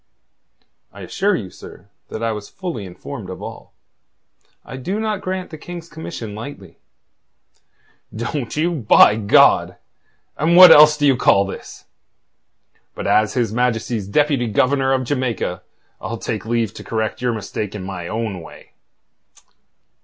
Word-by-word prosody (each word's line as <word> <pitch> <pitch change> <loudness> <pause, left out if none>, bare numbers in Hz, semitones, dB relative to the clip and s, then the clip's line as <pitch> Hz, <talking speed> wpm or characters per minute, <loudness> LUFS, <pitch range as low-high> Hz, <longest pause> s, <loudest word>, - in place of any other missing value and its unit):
"I - - -12
assure 200 0 0
you, 95 - -6
sir, 100 - -14 0.2
that 110 - -6
I 115 - 0
was 105 -1 -7
fully 175 - -6
informed 90 - -9
of - - -7
all. - - -9 0.9
I - - -9
do 180 +11 -3
not 215 -2 -2
grant 185 0 -4
the 155 - -9
King's 170 0 -9
commission 155 -10 -7
lightly." 105 - -10 1.3
"Don't 115 +3 -4
you, 165 +3 +1
by 115 -7 +5
God! 105 -2 +4 0.6
And 170 +3 +3
what 185 0 +11
else 150 0 +8
do 145 - +1
you 135 -2 +5
call 100 -4 +3
this? 95 - -9 1.1
But - - -6
as 110 +2 +2
His 115 -4 0
Majesty's 115 -3 -1
Deputy 140 +2 +1
Governor 135 +5 +1
of 130 -1 +1
Jamaica, 125 -8 -2 0.4
I'll 115 - -5
take 110 -2 -5
leave 115 -3 -1
to - - -10
correct 110 0 -3
your 125 -1 0
mistake 105 -1 -5
in 100 - -6
my 90 -2 -6
own 110 -4 -4
way." 80 - -14
120 Hz, 145 wpm, -20 LUFS, 105-150 Hz, 1.3 s, what